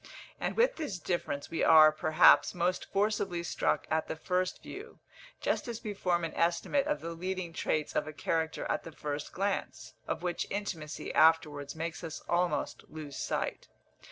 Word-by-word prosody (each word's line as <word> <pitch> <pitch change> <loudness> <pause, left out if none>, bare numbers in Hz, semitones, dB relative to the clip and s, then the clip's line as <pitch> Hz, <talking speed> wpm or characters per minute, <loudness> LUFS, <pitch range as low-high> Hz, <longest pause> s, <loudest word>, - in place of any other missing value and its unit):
And - - -2
with - - +3
this 300 - -3
difference 170 -5 -3
we 165 - 0
are, 155 -1 +8
perhaps, 155 +3 +5
most 180 +1 -1
forcibly 195 -4 0
struck - - 0
at 160 0 +1
the - - -3
first 180 +3 -1
view, 430 +4 -9 0.4
just - - -1
as 235 0 -5
we 210 -2 -3
form 175 -3 0
an 165 - -5
estimate 175 - +1
of 300 - -1
the 165 - -5
leading 180 0 -4
traits 155 -1 -1
of - - 0
a - - -4
character 160 +1 -1
at - - -1
the 165 - -8
first 150 -1 -5
glance, 185 -9 -3
of - - -3
which 175 -1 -2
intimacy 170 -7 -4
afterwards 155 -3 +3
makes 165 +2 -4
us 160 -2 -5
almost 175 0 0
lose 150 -3 -8
sight. - - -3
170 Hz, 170 wpm, -31 LUFS, 155-190 Hz, 0.4 s, are